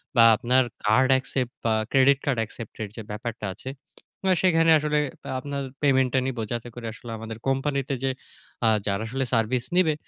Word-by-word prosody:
বা 115 - +7
আপনার 130 +3 +3 0.2
card 130 +5 +4
accept 130 -1 -3
বা 115 - +3 0.2
Credit 135 0 +5
card 135 -5 +1
accept 115 0 -9
এর 105 - -6
যে, 115 - -6
ব্যাপারটা 110 +1 -5
আছে। 130 - -7 0.7
সেখানে 165 -2 +4
আসলে 150 0 0 0.4
আপনার 140 +1 -4 0.2
payment 130 -2 +3
টা 130 - +4
নিবো 120 -3 -3
যাতে 120 0 -3
করে 120 -2 -6
আসলে 120 -1 -10
আমাদের 110 0 -7
company 135 +1 +1
তে 140 - 0
যে, 135 - +2 0.5
আ - - +5 0.2
যারা 100 0 -1
আসলে 135 +2 -1
service 120 +2 +1
নিবে 175 -4 +4
130 Hz, 180 wpm, -25 LUFS, 115-140 Hz, 0.7 s, বা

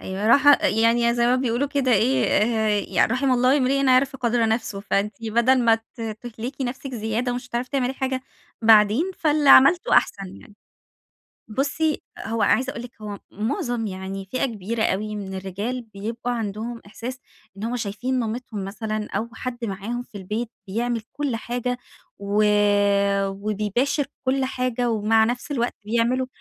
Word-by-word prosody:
يعني، 215 +8 +2 0.4
يعني 235 +1 +3
زي 240 0 +2
ما 250 +1 +3
بيقولوا 255 +2 0
كده 275 -3 +1
إيه، 235 +6 +3 0.7
يعني: - - +3
"رَحِم 260 +1 +1
الله 255 +2 +4
امرِأً 275 0 +2
عَرف 260 +1 +3
قَدْر 235 -2 +1
نَفْسهِ"، 220 -3 -2
فأنتِ 205 +1 0
بدل 235 +3 +3
ما 230 -1 +5
ت 225 +2 -11 0.2
تُهلكي 245 +3 -5
نفسك 260 +1 -5
زيادة، 225 +2 -1
ومش 245 0 -5
هتعرفي 245 +1 -3
تعملي 265 -2 0
حاجة 260 -1 -2 0.4
بعدين، 220 - +5
فاللي 300 -2 +2
عملتِه 350 - +6
أحسن 195 -2 0
يعني. 215 -5 -17 1.0
بُصي، 290 +6 0 0.2
هو 225 0 -2
عايزة 260 +1 +2
أقول 260 -4 -7
لِك، 245 - -9
هو 205 -1 -6
معظم 225 +2 -2
يعني 190 0 -5
فئة 255 - +1
كبيرة 220 -2 -1
من 205 -2 -5
الرجال، 200 +7 -4
بيبقى 230 +4 -3
عندهم 225 +2 -4
إحساس 240 +5 -7 0.4
إن 200 - -6
هم 240 +2 -2
شايفين 245 +4 -2
مامتهم 225 -3 -4
مثلًا، 215 +2 -4
أو 220 +3 -2
حد 240 +1 -5
معاهم 220 +4 -4
في 230 -4 -11
البيت 215 +5 -4 0.2
بيعمل 230 +3 -2
كل 285 -5 -2
حاجة، 245 +2 -3 0.4
و 200 +1 +1 0.8
وبيباشر 210 +8 -1 0.2
كل 265 +1 +1
حاجة، 250 -2 -1
ومع 220 0 +3
نفس 245 +5 -3
الوقت 245 -4 -1
بيعملوا 235 +4 +1
235 Hz, 150 wpm, -23 LUFS, 215-255 Hz, 1.0 s, عملتِه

